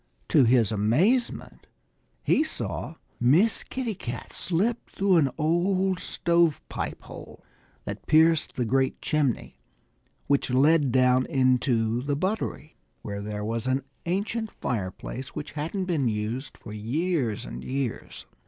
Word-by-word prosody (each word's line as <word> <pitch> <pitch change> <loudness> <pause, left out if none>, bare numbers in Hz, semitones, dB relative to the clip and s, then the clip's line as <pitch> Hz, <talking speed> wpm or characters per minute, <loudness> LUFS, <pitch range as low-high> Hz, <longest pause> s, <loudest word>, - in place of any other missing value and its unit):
To 140 -5 +5
his 115 -3 +4
amazement 155 - +1 0.6
he 300 - +3
saw 240 - -4 0.2
Miss 160 - +3
Kitty 250 -4 -3
Cat 120 - -7
slip 205 +7 -1
through 195 -2 +2
an 145 -4 +4
old 185 +4 +1
stove 170 -3 +2
pipe - - -4
hole - - -11 0.4
that - - -6
pierced 160 +1 +4
the 125 - 0
great 130 +3 +1
chimney 145 -6 -1 0.7
which 140 -1 +1
led 140 +2 +4
down 130 0 +3
into 125 -4 +2
the 140 +2 -1
buttery, 185 -3 -3 0.3
where 100 -1 -5
there 105 0 -4
was 115 +2 -2
an 130 +1 +1 0.2
ancient 215 +5 -1
fireplace 115 - -5
which 150 - -5
hadn't 165 +6 -3
been 160 -8 0
used 115 +6 -3
for 105 - -10
years 125 - -1
and - - -7
years. 130 -3 -4
140 Hz, 130 wpm, -26 LUFS, 120-175 Hz, 0.7 s, To